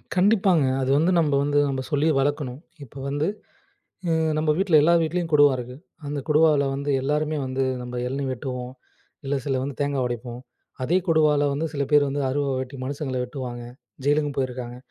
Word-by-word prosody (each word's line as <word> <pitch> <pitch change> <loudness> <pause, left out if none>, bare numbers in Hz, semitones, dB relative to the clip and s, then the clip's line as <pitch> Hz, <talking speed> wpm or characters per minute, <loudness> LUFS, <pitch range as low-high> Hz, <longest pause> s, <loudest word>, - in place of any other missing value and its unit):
கண்டிப்பாங்க. 190 -5 +3 0.2
அது 130 - -1
வந்து 170 +4 +3
நம்ம 150 -3 +1
வந்து 145 0 +2
நம்ம 135 -1 -2
சொல்லி 145 +1 +2
வளக்கணும். 135 -2 -1 0.2
இப்ப 135 +1 -10
வந்து, 145 +3 -1 0.8
எ - - +3 0.3
நம்ம 155 0 +1
வீட்ல 190 -4 +3
எல்லா 170 +3 +5
வீட்லயும் 165 +1 -2
கொடுவா 145 -1 +6
இருக்கு. 125 +1 -7 0.3
அந்த 145 0 -3
கொடுவாவுல 150 -2 +4
வந்து 140 +1 -3
எல்லாருமே 150 +2 0
வந்து 130 +1 -2 0.2
நம்ம 125 0 -5
எளநீ 135 +2 -3
வெட்டுவோம். 125 0 -5 0.5
இல்ல 135 - -1
சில 135 -2 0
வந்து 140 0 -5
தேங்காய் 140 -2 0
உடைப்போம். 120 0 -5 0.4
அதே 170 +7 +2
கொடுவால 155 -3 +3
வந்து 150 +4 -1
சில 140 - -1
பேரு 145 -1 +5
வந்து 140 +1 -2
அருவா 140 +1 -1
வெட்டி 130 +1 -6
மனுஷங்கள 140 -1 -4
வெட்டுவாங்க. 125 -2 -6 0.4
ஜெயிலுக்கும் 145 0 +1
போயிருக்காங்க. 125 -2 -3
145 Hz, 170 wpm, -24 LUFS, 130-150 Hz, 0.8 s, கொடுவா